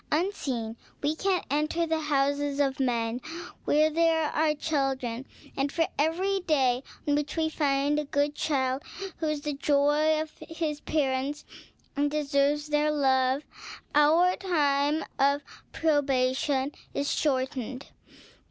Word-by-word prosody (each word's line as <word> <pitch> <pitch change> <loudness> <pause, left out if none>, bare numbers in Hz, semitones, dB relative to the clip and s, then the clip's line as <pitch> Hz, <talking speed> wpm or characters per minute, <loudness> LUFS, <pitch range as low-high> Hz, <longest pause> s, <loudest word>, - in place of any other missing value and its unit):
"Unseen 265 - -1 0.3
we 300 +2 +1
can 380 +1 0
enter 305 +3 +1
the 320 -1 0
houses 285 -1 0
of 275 -2 +1
men, 240 -2 0 0.4
where 305 +1 +4
there 325 -1 +2
are 305 0 +2
children, 270 -5 -2 0.3
and 275 +1 0
for 330 0 +1
every 365 +6 +1
day 265 -8 +2 0.3
on 290 - +3
which 295 +2 -1
we 320 -1 +2
find 285 -1 +1
a 300 - -2
good 285 +1 0
child, 265 -3 0 0.4
who 320 - -2
is 305 -1 -1
the 295 0 -2
joy 295 +2 +2
of 310 0 -4 0.2
his 320 -3 -3
parents 280 -1 -1 0.5
and 290 +1 +1
deserves 295 0 +1
their 300 0 +2
love, 265 -1 +2 0.5
our 320 +5 +5
time 295 -5 +1 0.2
of 280 +1 +3 0.3
probation 270 -2 +1 0.2
is 285 0 0
shortened. 260 -2 -1
290 Hz, 130 wpm, -28 LUFS, 275-310 Hz, 0.5 s, our